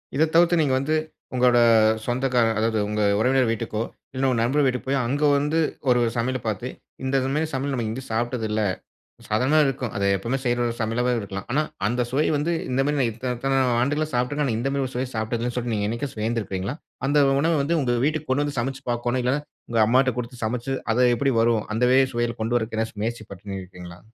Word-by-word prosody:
இதை 155 Hz, +3 st, +4 dB
தவிர்த்து 170 Hz, 0 st, +5 dB
நீங்க 145 Hz, -4 st, +2 dB
வந்து 150 Hz, +4 st, 0 dB, 0.4 s
உங்களோட 125 Hz, -1 st, +4 dB, 0.5 s
சொந்தக்காரர் 120 Hz, -3 st, +1 dB
அதாவது 110 Hz, 0 st, +1 dB
உங்க 105 Hz, 0 st, -1 dB, 0.2 s
உறவினர் 130 Hz, +1 st, +3 dB
வீட்டுக்கோ 115 Hz, -1 st, -2 dB, 0.3 s
இல்லை 130 Hz, +1 st, 0 dB
உங்க 125 Hz, -, +1 dB
நண்பர்கள் 140 Hz, +5 st, +2 dB
வீட்டுக்கு 125 Hz, 0 st, -2 dB
போய், 140 Hz, 0 st, +2 dB
அங்க 140 Hz, +4 st, -1 dB, 0.2 s
வந்து 150 Hz, +3 st, 0 dB, 0.3 s
ஒரு 125 Hz, -1 st, +4 dB
சமையல 130 Hz, +2 st, -1 dB
பார்த்து, 110 Hz, +2 st, -2 dB, 0.4 s
"இந்த 130 Hz, +1 st, -1 dB, 0.2 s
மாரி 155 Hz, +2 st, 0 dB
சமையல் 135 Hz, +1 st, -1 dB
நம்ம 120 Hz, -3 st, -1 dB
எங்கயும் 130 Hz, +4 st, -6 dB
சாப்பிட்டது 120 Hz, 0 st, -1 dB
இல்லை." 105 Hz, -1 st, +1 dB, 0.6 s
சாதாரணமாவே 130 Hz, +8 st, +3 dB
இருக்கும். 125 Hz, -4 st, -3 dB
அதை 100 Hz, 0 st, 0 dB
எப்பவுமே 115 Hz, +8 st, -2 dB
செய்ற 120 Hz, 0 st, +1 dB
ஒரு 115 Hz, -, -2 dB
சமையலாவே 120 Hz, +3 st, 0 dB
இருக்கலாம். 100 Hz, -2 st, -6 dB
ஆனா 145 Hz, +5 st, +2 dB, 0.3 s
அந்த 125 Hz, +3 st, 0 dB
சுவை 145 Hz, +4 st, +2 dB
வந்து 155 Hz, +4 st, -1 dB, 0.2 s
இந்த 130 Hz, +2 st, +2 dB
மாரி 145 Hz, 0 st, 0 dB
நான் 125 Hz, -3 st, +2 dB
இத்தனை 125 Hz, +3 st, -3 dB
இத்தனை 135 Hz, +1 st, +1 dB, 0.2 s
ஆண்டுகளா 145 Hz, +4 st, 0 dB
சாப்பிட்டுருக்கேன், 135 Hz, +4 st, 0 dB
ஆனா 110 Hz, -, 0 dB
இந்த 130 Hz, +3 st, -1 dB
மாதிரி 140 Hz, -1 st, 0 dB
ஒரு 130 Hz, -, -12 dB
சுவைய 125 Hz, +1 st, -2 dB
சாப்பிட்டதில்லைன்னு 115 Hz, +2 st, -2 dB
சொல்லி, 120 Hz, -1 st, -1 dB
நீங்க 105 Hz, -1 st, 0 dB
என்னைக்காச்சும் 115 Hz, -1 st, -4 dB
வியந்திருக்கிறீங்களா? 110 Hz, -1 st, -2 dB, 0.3 s
அந்த 145 Hz, 0 st, +4 dB
உணவை 165 Hz, +3 st, +2 dB
வந்து 165 Hz, +4 st, +1 dB
உங்க 120 Hz, -2 st, +1 dB
வீட்டுக்கு 155 Hz, -1 st, -2 dB
கொண்டு 135 Hz, +3 st, +2 dB
வந்து 145 Hz, -1 st, -5 dB
சமைச்சு 135 Hz, +3 st, -3 dB
பார்க்கோணும். 120 Hz, +1 st, -1 dB
இல்லைன்னா 135 Hz, +4 st, 0 dB, 0.3 s
உங்க 115 Hz, -1 st, +1 dB
அம்மாட்ட 130 Hz, +4 st, +3 dB
கொடுத்து 125 Hz, -1 st, -5 dB
சமைச்சு, 120 Hz, +4 st, -2 dB, 0.2 s
அது 125 Hz, -, +2 dB
எப்படி 135 Hz, +3 st, +1 dB
வரும்? 115 Hz, -2 st, +2 dB
அந்த 115 Hz, +3 st, 0 dB
வே 130 Hz, -, +6 dB
சுவையில 120 Hz, 0 st, -1 dB
கொண்டு 115 Hz, +2 st, 0 dB
வரதுக்கு 110 Hz, -1 st, -3 dB
எதாச்சு 110 Hz, -1 st, -3 dB
முயற்சி 115 Hz, 0 st, -3 dB
பண்ணியிருக்கிறீங்களா? 90 Hz, -2 st, -8 dB
125 Hz, 200 wpm, -24 LUFS, 115-135 Hz, 0.6 s, வே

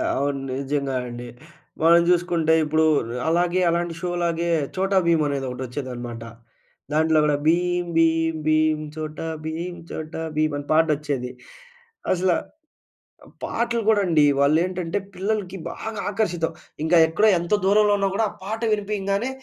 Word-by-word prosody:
అవును. 140 Hz, 0 st, -1 dB, 0.2 s
నిజంగా 140 Hz, -1 st, -2 dB
అండి. 120 Hz, 0 st, -7 dB, 0.6 s
మనం 170 Hz, +1 st, +7 dB
జూసుకుంటే 170 Hz, -2 st, +2 dB
ఇప్పుడు, 155 Hz, +1 st, +1 dB, 0.3 s
ర్ -, -, -5 dB, 0.2 s
అలాగే 175 Hz, +2 st, +2 dB
అలాంటి 170 Hz, 0 st, -1 dB
షోలాగే 170 Hz, -1 st, -1 dB, 0.3 s
'చోటా 190 Hz, +1 st, +1 dB
భీం' 165 Hz, -2 st, +3 dB
అనేది 140 Hz, -2 st, -2 dB
ఒకటొచ్చేదనమాట. 125 Hz, -2 st, -6 dB, 0.7 s
దాంట్లో 160 Hz, +1 st, +3 dB
గూడా 150 Hz, -1 st, +2 dB
భీం 175 Hz, +2 st, +2 dB
భీం 165 Hz, 0 st, +3 dB
భీం, 155 Hz, 0 st, +3 dB, 0.2 s
చోటా 155 Hz, +1 st, -5 dB, 0.2 s
భీం 170 Hz, +3 st, -4 dB, 0.2 s
చోటా 155 Hz, +1 st, -5 dB
భీమ్ 155 Hz, -1 st, +1 dB
అని 145 Hz, -, -6 dB
పాటొచ్చేది. 150 Hz, -5 st, +1 dB, 0.8 s
అసల 185 Hz, 0 st, +2 dB, 0.9 s
ఆ -, -, -17 dB, 0.2 s
పాటలు 235 Hz, 0 st, -1 dB
గూడా 215 Hz, -2 st, +4 dB
అండి 155 Hz, -3 st, +4 dB
వాళ్ళేంటంటే, 165 Hz, +5 st, +1 dB, 0.2 s
పిల్లలకి 195 Hz, -1 st, -2 dB
బాగా 220 Hz, -2 st, -6 dB
ఆకర్షితం. 175 Hz, -6 st, -1 dB, 0.3 s
ఇంకా 165 Hz, +2 st, +4 dB
ఎక్కడ 175 Hz, +7 st, +1 dB
ఎంతో 175 Hz, +4 st, +1 dB
దూరంలో 205 Hz, +1 st, +4 dB
ఉన్నా 195 Hz, 0 st, +1 dB
గూడా 225 Hz, -, +2 dB
ఆ -, -, -12 dB
పాట 220 Hz, +3 st, -4 dB
వినిపియంగానే, 205 Hz, +2 st, -1 dB
165 Hz, 135 wpm, -23 LUFS, 155-185 Hz, 0.9 s, మనం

